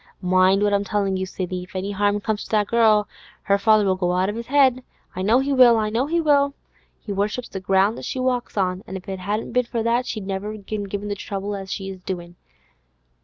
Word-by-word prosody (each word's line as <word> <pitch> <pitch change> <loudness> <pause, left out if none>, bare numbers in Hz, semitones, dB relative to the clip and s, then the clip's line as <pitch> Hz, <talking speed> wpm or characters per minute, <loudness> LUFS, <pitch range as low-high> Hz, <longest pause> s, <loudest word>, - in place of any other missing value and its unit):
Mind 185 +2 +3
what 205 0 +2
I'm 200 0 +2
tellin' 200 -1 -1
you, 190 0 -2
Sidney; 185 -1 -4
if 185 +3 -13
any 195 +2 -3
'arm 205 +1 +1
comes 215 0 -2
to - - -13
that 210 -1 +2
girl, 215 -1 +3 0.4
her 200 0 +2
father'll 210 -2 +4
go 180 -1 0
out 185 +2 +1
of 210 - -4
his 235 +1 -7
'ead. 260 -3 +4 0.3
I 185 - -3
know 215 +6 +4
he 280 +1 -1
will! 250 -3 +7
I 215 -1 0
know 240 +5 0
he 335 +2 +1
will! 285 -3 +3 0.4
He 210 - -8
worships 210 +5 -2
the 190 - -5
ground 195 +3 +2
as - - -7
she - - -4
walks 250 -3 -1
on, 185 0 0
an' 190 - -5
if 185 - -13
it 190 -1 -4
hadn't 205 +4 -3
been 250 +1 +1
for 230 -1 -3
that, 235 +2 +1
she'd 215 -4 -4
never 195 +2 -4
have 210 -2 -11
given 205 -2 -4
him 205 +1 -4
the 205 - -2
trouble 200 0 -4
as 195 -1 -7
she 195 -2 -4
is 190 - -10
doin'. 175 -2 -6
205 Hz, 245 wpm, -22 LUFS, 190-230 Hz, 0.4 s, will